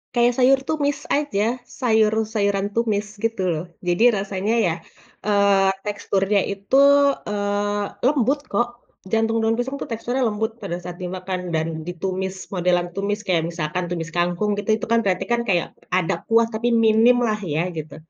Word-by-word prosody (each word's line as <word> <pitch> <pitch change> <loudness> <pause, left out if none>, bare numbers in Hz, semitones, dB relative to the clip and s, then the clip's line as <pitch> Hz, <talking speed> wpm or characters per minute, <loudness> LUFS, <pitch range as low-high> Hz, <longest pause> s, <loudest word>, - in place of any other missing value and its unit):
Kayak 240 0 +4
sayur 265 +1 +5
tumis 290 -2 0 0.2
aja, 285 -9 0 0.4
sayur-sayuran 215 -3 +1
tumis 215 -3 +1 0.2
gitu 225 -3 -1
loh, 160 0 -2 0.2
jadi 175 +5 +2 0.2
rasanya 195 +2 -2
ya, 165 - +1 0.5
eee, 200 -2 +3 0.2
teksturnya 205 0 0
itu, 200 +5 -2 0.5
eee, 205 0 -1 0.2
lembut 275 0 +2
kok, 240 - +2 0.4
jantung 225 0 +1
daun 225 0 +2
pisang 245 +3 -2
tuh - - -5
teksturnya 245 +3 -1
lembut 220 +1 -1
pada 170 - -4
saat 175 +1 -8
dimakan 185 +1 -4 0.2
dan 160 0 0 0.2
ditumis, 190 +2 -3 0.2
modelan 175 -1 +1
tumis 200 +3 -2
kayak 170 -3 +1
misalkan 170 +2 -3
tumis 165 -1 -4
kangkung 175 +4 0
gitu, 205 - -6
itu 220 - -9
kan 230 - +5
berarti 185 -3 0
kan 235 0 +2
kayak 175 -3 +1 0.3
ada 185 +1 +1
kuah 230 0 +4
tapi 220 +2 -1 0.2
minimlah 225 0 +4
ya 170 +4 0
gitu. 155 0 -6
205 Hz, 155 wpm, -22 LUFS, 185-225 Hz, 0.5 s, sayur